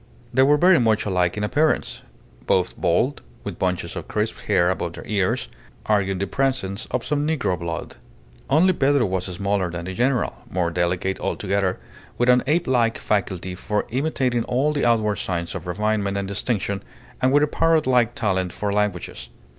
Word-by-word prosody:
They 130 - +4
were 145 +2 +5
very 180 +2 +5
much 110 -3 +2
alike 90 -2 +1
in 105 - -2
appearance, 150 +9 +1 0.5
both 90 -1 +2
bald, 125 +12 +1 0.2
with 100 -4 -6
bunches 90 -2 -1
of - - -6
crisp - - -1
hair 90 +1 +3
above 85 -2 -3
their - - -9
ears, 100 -4 0 0.4
arguing 95 -3 +1
the 100 - -1
presence 130 -4 -1
of - - -2
some 150 0 0
negro 130 - 0
blood. 85 -1 -5 0.5
Only 170 +7 +4
Pedro 140 -4 +3
was 95 -2 -1
smaller 100 0 -1
than 85 0 -5
the 95 - -5
general, 125 +5 0
more 90 -2 0
delicate 90 +2 -1
altogether, 100 -2 -1 0.4
with 120 +1 +2
an 125 0 +6
ape 165 +4 +2
like 120 -3 +2
faculty 95 -3 -1
for 105 +3 -2
imitating 130 -3 0
all 140 +5 +1
the 145 - 0
outward 110 -4 +2
signs 85 -4 -3
of - - -6
refinement 100 +1 0
and 100 -1 -2
distinction, 100 -1 -2 0.4
and 130 0 +3
with 145 +1 +5
a - - +3
parrot 165 +1 +2
like 125 -2 +2
talent 95 -4 0
for 100 +2 -2
languages. 105 -4 -2
105 Hz, 175 wpm, -23 LUFS, 95-130 Hz, 0.5 s, an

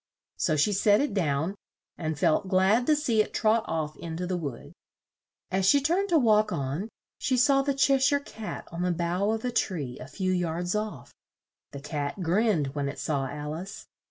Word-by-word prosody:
So 155 - +1
she 155 +8 +2
set 205 +1 +4
it 285 -6 0
down, 160 -2 0 0.4
and 155 -2 -3
felt 155 +6 +2
glad 195 +6 +3
to 305 - +5
see 245 -8 +2
it - - -4
trot 220 0 +3
off 155 -2 -2
in 165 -1 -6
to 180 - -3
the 180 0 -2
wood. 145 -8 -6 0.8
As 190 0 +1
she 285 - +6
turned 350 +8 +1
to 340 - +4
walk 215 -5 +4
on, 140 +10 -3 0.3
she 260 -3 +1
saw 275 +2 +4
the 275 0 -1
Che 275 0 +3
shire 285 +2 +3
Cat 220 -6 -8
on 170 +1 -5
the 180 0 +1
bough 175 +4 0
of 220 +2 -1
a 250 - 0
tree 150 - -2
a 125 - -8
few 185 +5 -2
yards 175 0 -1
off. 210 - -4 0.6
The 140 - -8
Cat 145 +2 -4
grinned 170 -6 +1
when 140 -1 -2
it - - -7
saw 140 -3 -1
Al 150 +2 -5
ice. 185 +5 -7
185 Hz, 200 wpm, -27 LUFS, 155-225 Hz, 0.8 s, she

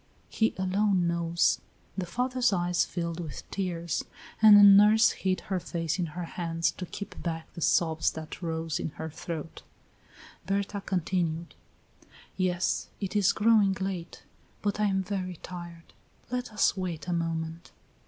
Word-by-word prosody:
He 220 - +1
alone 190 0 +2
knows." 170 0 +1 0.3
The 185 -2 -3
father's 250 +5 +1
eyes 175 -2 +1
filled 170 -1 -4
with 160 -4 -7
tears, 170 -4 -2 0.4
and 215 -2 +10
the 205 - +9
nurse 210 +2 +7
hid 185 -1 -1
her 190 -1 -2
face 165 0 -3
in 175 - 0
her 180 - -2
hands 165 -1 -1
to 180 - -7
keep 200 - -8
back 165 -2 -5
the 170 - -8
sobs 160 -1 +2
that 160 +3 -8
rose 160 -2 -2
in - - -2
her 160 0 -5
throat. 165 0 -6 0.9
Berta 200 +1 -1
continued: 175 -3 -1 0.8
"Yes, 180 -1 0
it 195 0 -4
is 205 -2 +4
growing 215 -3 +4
late. 190 -3 -5 0.4
But 205 0 -1
I 210 - +3
am 190 -1 +1
very 185 -2 -3
tired. 175 -2 -9 0.4
Let 250 -1 -3
us 210 - +2
wait 180 -4 -4
a 175 - 0
moment." 165 0 -3
180 Hz, 150 wpm, -28 LUFS, 165-200 Hz, 0.9 s, and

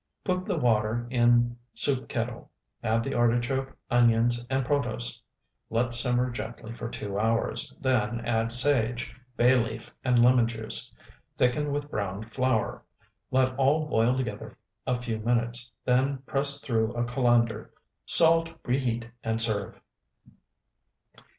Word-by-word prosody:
Put 185 0 -1
the 190 -5 -2
water 115 -2 +1
in 120 -1 +3 0.2
soup 135 -2 +2
kettle; 115 0 -4 0.3
add 115 +1 0
the - - -4
artichoke, 120 +3 0
onions, 120 0 +3
and 135 -1 0
protose. 120 -4 -2 0.5
Let 120 +1 -1
simmer 125 +1 0
gently 115 0 -7
for 115 0 -6
two 100 -3 -4
hours, 115 +1 -1
then 120 -4 0
add 115 -1 0
sage, 125 -2 +1 0.2
bay 125 +2 +5
leaf, 115 -2 -2
and 125 -1 +2
lemon 120 0 +5
juice. 110 -1 -3 0.5
Thicken 145 +4 +1
with 145 +1 -4
browned 105 +2 -5
flour. 130 -4 -1 0.5
Let 130 0 +1
all 145 +4 +2
boil 125 -3 +1
together 110 -3 -5 0.3
a 125 -1 0
few 115 -3 -4
minutes, 120 +1 0
then 130 +2 +1
press 140 0 +1
through 115 -4 -1
a 120 - 0
colander, 120 -3 0 0.4
salt, 165 0 +8 0.2
reheat, 120 -2 -1 0.2
and 115 0 -1
serve. 110 -3 +1
120 Hz, 130 wpm, -27 LUFS, 115-130 Hz, 0.5 s, salt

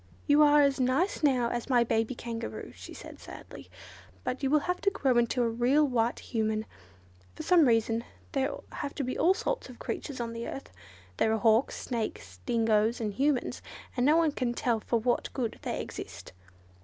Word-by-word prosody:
"You 290 +1 +5
are 295 0 +6
as 280 -1 +2
nice 265 +10 +1
now 255 -5 +2
as 240 +2 -3
my 245 -2 +5
baby 225 +2 0
Kangaroo," 230 -1 -6
she - - -11
said - - -10
sadly, - - -11 0.5
"but 255 - -3
you 270 - +1
will 300 +1 +4
have 360 +4 -2
to 395 - +3
grow 275 -10 +1
into 240 +1 +1
a - - +2
real 250 +6 +3
white 240 -2 +1
Human. 220 -1 -1 0.7
For - - -6
some 345 -5 +5
reason 225 0 +2 0.3
there 270 -1 0 0.2
have 285 -1 -5
to 280 - -2
be 255 0 -3
all 365 +3 +4
sorts - - -3
of - - -11
creatures 280 -4 -5
on 230 -1 -3
the 230 0 -5
earth. 275 - -7 0.5
There 220 - +2
are 220 - +2
hawks, 225 +3 +3
snakes, 215 - -4
dingoes 225 0 +2
and 215 -3 -2
humans, 275 +1 0 0.3
and 245 - +1
no 300 +5 +5
one 330 -2 +3
can 245 -4 -2
tell 235 -2 +1
for 235 - 0
what 240 +2 0
good 240 -4 -3
they - - -3
exist. - - -8
245 Hz, 190 wpm, -29 LUFS, 230-280 Hz, 0.7 s, are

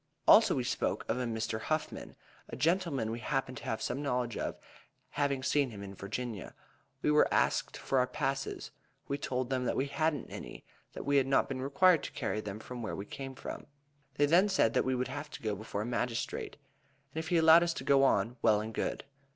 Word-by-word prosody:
Also - - +7
we - - 0
spoke - - -1
of 115 +3 0
a 125 - -1
Mr. 110 -1 -2
Houghman, 155 +4 -3 0.3
a - - -6
gentleman 165 - +1
we 115 - -4
happened 130 +1 -2
to - - -9
have 110 - -2
some 140 - -2
knowledge 125 -5 -1
of, - - -3 0.5
having 140 -2 0
seen 140 -1 +2
him 105 -3 -8
in 100 -1 -8
Virginia. 105 +1 -5 0.5
We 150 - +3
were 150 - +5
next - - +2
asked - - +1
for 135 - 0
our 125 - +2
passes. 135 +1 -3 0.4
We 140 - -2
told 130 -2 -2
them 130 -1 0
that - - 0
we 135 - +1
hadn't 145 0 -1
any, - - -8 0.3
that - - -7
we 140 0 +3
had 135 -1 +3
not 135 - +3
been 130 -1 -4
required 160 +5 +4
to - - -6
carry 110 - -2
them 105 0 -6 0.2
where 110 - -3
we 100 - -5
came 135 +4 -7
from. - - -7 0.5
They 145 - +4
then 175 +7 +4
said 115 - +3
that - - +2
we 130 0 +1
would 125 0 -1
have 145 +3 -6
to 150 - -9
go 110 -2 -1
before 105 0 -4
a - - -5
magistrate, 120 -1 -3 0.6
and 160 - -3
if 160 - -5
he 175 0 +2
allowed 160 +1 +8
us 170 -1 0
to - - -5
go 135 0 +4
on, 115 -1 +2
well 110 -2 +4
and 110 +1 -5
good. - - -2
130 Hz, 220 wpm, -32 LUFS, 115-145 Hz, 0.6 s, allowed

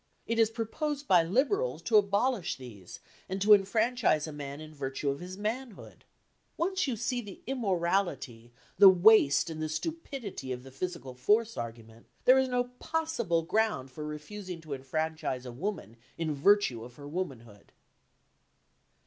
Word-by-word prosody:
It 230 0 -1
is 225 -1 +5
proposed 285 +6 -3
by 180 -5 +6
Liberals 285 - +1
to 230 - 0
abolish 205 0 +1
these 110 -9 -11 0.3
and 190 +1 -2
to 210 +2 +7
enfranchise 210 -4 +2
a 155 - -6
man 145 -1 -7
in 155 0 -10
virtue 140 0 -2
of 140 - -5
his 180 +2 -8
manhood. 225 +2 -5 0.5
Once 370 0 0
you 255 - -1
see 240 +3 -2
the 205 -4 -11
immorality, 175 - -1 0.3
the 200 -1 +11
waste 185 -5 +5
and 155 -1 -6
the 155 - -2
stupidity 250 - -5
of 125 0 -5
the 135 - -12
physical 135 -2 -5
force 215 - +2
argument, 115 0 -8 0.2
there 260 +1 +7
is 265 -1 +1
no 250 0 +1 0.2
possible 275 - -1
ground 195 -8 0
for 150 +4 -7
refusing 170 +5 -7
to 155 -3 -6
enfranchise 135 -1 -3
a 125 - -6
woman 130 - -5 0.2
in 160 -2 -1
virtue 145 - +3
of 120 +1 -12
her 145 +1 -10
womanhood. 125 - -6
180 Hz, 155 wpm, -30 LUFS, 140-225 Hz, 0.5 s, the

